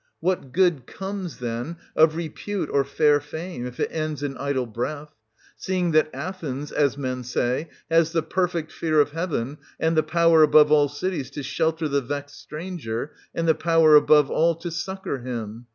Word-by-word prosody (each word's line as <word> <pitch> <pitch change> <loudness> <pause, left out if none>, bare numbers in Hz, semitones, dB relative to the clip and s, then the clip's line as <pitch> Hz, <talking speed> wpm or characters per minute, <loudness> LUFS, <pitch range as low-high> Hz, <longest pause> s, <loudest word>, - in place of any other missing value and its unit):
What 175 -8 -1
good 170 -7 +2
comes, 190 -7 -6
then, 120 +7 -4 0.2
of 155 0 +5
repute 170 +2 -4
or 140 - +3
fair 145 +1 +3
fame, 160 +5 -7
260 - - -3
if 125 - -10
it - - -1
ends 155 -3 -3
in 140 -2 -3
idle 140 -2 -1
breath; 145 +6 -5 0.4
seeing 180 -2 -1
that 155 0 +3
Athens, 150 -7 -5
as 140 -2 +1
men 130 -2 -3
say, 125 +5 -1 0.2
has 165 0 +3
the 165 -2 0
perfect 170 -2 -1
fear 155 -2 0
of 145 0 +3
Heaven, 150 -5 -3 0.2
and 160 +1 +1
the 155 - +5
power, 165 0 +4
above 150 0 +6
all 145 -1 +5
cities, 145 -1 -3
to 145 - -6
shelter 160 +3 0
the 140 -1 +1
vexed 145 +2 -6
stranger, 150 -6 -5 0.2
and 165 0 -1
the 160 - +6
power, 165 -1 +4
above 150 -1 +6
all, 165 +1 +3
to 170 +1 -6
succour 190 -3 -4
him 120 -2 -6
155 Hz, 180 wpm, -24 LUFS, 140-165 Hz, 0.4 s, above